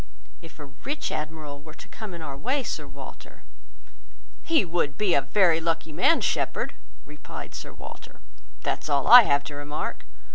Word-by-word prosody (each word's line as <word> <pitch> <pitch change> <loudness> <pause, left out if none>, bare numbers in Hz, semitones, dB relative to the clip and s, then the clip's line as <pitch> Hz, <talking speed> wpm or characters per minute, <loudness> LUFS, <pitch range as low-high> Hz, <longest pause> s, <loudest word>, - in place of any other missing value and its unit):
If 165 -2 -14
a 150 - -9
rich 270 - -5
admiral 150 -2 -5
were 155 +1 -13
to - - -13
come 210 -5 -8
in 165 - -8
our 140 -3 -6
way, 260 - -1
Sir - - -4
Walter—" - - -12 1.0
"He 320 - +2
would 165 -4 -1
be 205 -4 +2
a 140 - +4
very 175 -1 +3
lucky 165 -1 -1
man, 185 - +3
Shepherd," - - -1 0.3
replied 150 -1 -10
Sir - - -7
Walter; - - -12 0.4
"that's - - -2
all 140 -2 +2
I 245 +1 +12
have 140 0 +2
to 145 - -8
remark. 145 +1 -5
160 Hz, 170 wpm, -26 LUFS, 145-185 Hz, 1.0 s, I